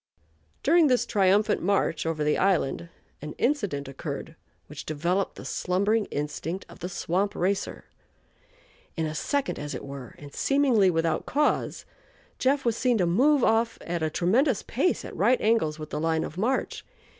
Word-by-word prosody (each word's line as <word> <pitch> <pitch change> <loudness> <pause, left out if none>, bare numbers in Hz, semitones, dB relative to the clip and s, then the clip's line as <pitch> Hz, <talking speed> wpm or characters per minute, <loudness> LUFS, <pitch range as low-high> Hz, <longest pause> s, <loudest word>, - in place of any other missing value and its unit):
During 325 +1 +5
this 250 -3 +2
triumphant 200 0 +2
march 180 -4 0
over 155 -2 -1
the 150 0 +2
island 170 -3 +1 0.3
an 150 0 -6
incident 205 - -1
occurred 140 +3 -6 0.3
which 150 0 -9
developed 170 +6 -1
the - - -10
slumbering 200 +4 0
instinct 150 +5 -4
of - - -14
the 180 +1 -4
swamp 185 +3 -1
"racer." 190 +2 -2 1.1
In 160 - 0
a 155 - -3
second, 280 - -1
as 145 0 -5
it - - -7
were, 135 -3 -9
and 145 -1 -12
seemingly 265 -9 +3
without 165 -2 0
cause, 295 +2 0 0.5
"Jeff" 270 +1 +1
was 235 -2 +2
seen 245 -1 +2
to 180 - +2
move 260 - +3
off 225 +1 +2
at 170 -1 -3
a 160 - +1
tremendous 215 - +2
pace 280 +10 0
at - - -8
right 255 +1 +3
angles 210 -9 +1
with 155 -1 -8
the 150 - -2
line 160 0 +1
of 155 - -6
march. 235 +8 -1
185 Hz, 165 wpm, -26 LUFS, 155-235 Hz, 1.1 s, During